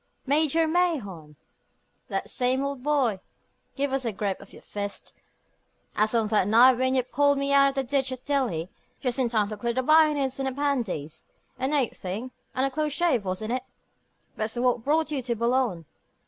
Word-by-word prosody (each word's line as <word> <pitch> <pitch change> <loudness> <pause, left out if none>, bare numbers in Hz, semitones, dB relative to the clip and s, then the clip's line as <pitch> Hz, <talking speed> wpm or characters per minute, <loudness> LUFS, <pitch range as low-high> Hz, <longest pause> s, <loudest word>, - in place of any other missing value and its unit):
"Major 310 +3 +3
Mahon!" 240 - -1 0.7
"That - - -3
same, 255 +2 +1
old 280 -2 -4
boy. 265 -8 +1 0.6
Give 280 -1 -1
us 270 -1 0
a 230 - -1
grip 200 -1 -3
of - - -14
your - - -15
fist, 205 -1 -6 0.8
as 215 +2 +1
on 225 -1 +2
that 210 -3 +2
night 240 +4 +6
when 260 0 +1
you 255 - +2
pulled 285 +3 +2
me 275 0 0
out 275 0 +6
of 275 - -7
the 270 - 0
ditch 265 0 0
at 255 -1 -7
Delhi, 240 - -1 0.3
just 250 0 0
in 250 -2 +2
time 215 -3 +1
to 215 - -6
clear 235 +2 -2
the 260 +2 -1
bayonets 300 -3 +3
of 270 - -1
the 265 - -2
pandys. 240 - -2 0.3
A 260 - 0
nate 280 -4 +1
thing, 210 +8 -5 0.2
and 260 +1 +2
a 275 - -1
close 305 +1 -1
shave, 295 - +1
wasn't 190 +4 -3
it? 255 0 -2 0.7
But's 215 +1 -3
what 240 -1 +1
brought 310 +3 +1
you 280 -3 -1
to 240 -1 -2
Boulogne?" 235 -7 0
255 Hz, 190 wpm, -26 LUFS, 220-280 Hz, 0.8 s, night